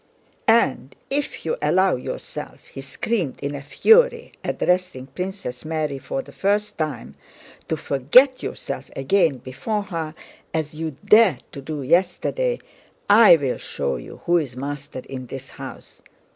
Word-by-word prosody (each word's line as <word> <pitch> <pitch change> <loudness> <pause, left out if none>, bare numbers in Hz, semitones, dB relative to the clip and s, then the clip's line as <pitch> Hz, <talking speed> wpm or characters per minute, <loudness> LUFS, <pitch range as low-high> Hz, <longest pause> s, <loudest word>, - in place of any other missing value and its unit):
"And 140 - +3 0.2
if 285 +1 -2
you 480 - -1
allow 185 0 +3
yourself," 125 - -7
he 135 - -9
screamed 150 - -2
in 140 +1 -3
a 140 - -5
fury, 470 - +4
addressing 180 -8 0
Princess 180 -6 -6
Mary 155 -3 -2
for 270 - -4
the - - -14
first 205 +2 0
time, 150 -7 -4 0.5
"to 160 - -1
forget 205 - +4
yourself - - -5
again 150 +1 +2
before 205 - -3
her 165 -5 -5 0.4
as 155 -1 -2
you 155 -2 -5
dared 205 - +5
to 140 - -8
do 145 0 -5
yesterday, 190 - +1 0.5
I 210 -3 +9
will 140 -5 -2
show 70 -2 -2
you - - -11
who 175 0 +4
is 130 -6 -5
master 140 -1 -5
in 130 -2 -7
this 135 +1 -8
house. - - -10
160 Hz, 145 wpm, -23 LUFS, 135-205 Hz, 0.5 s, I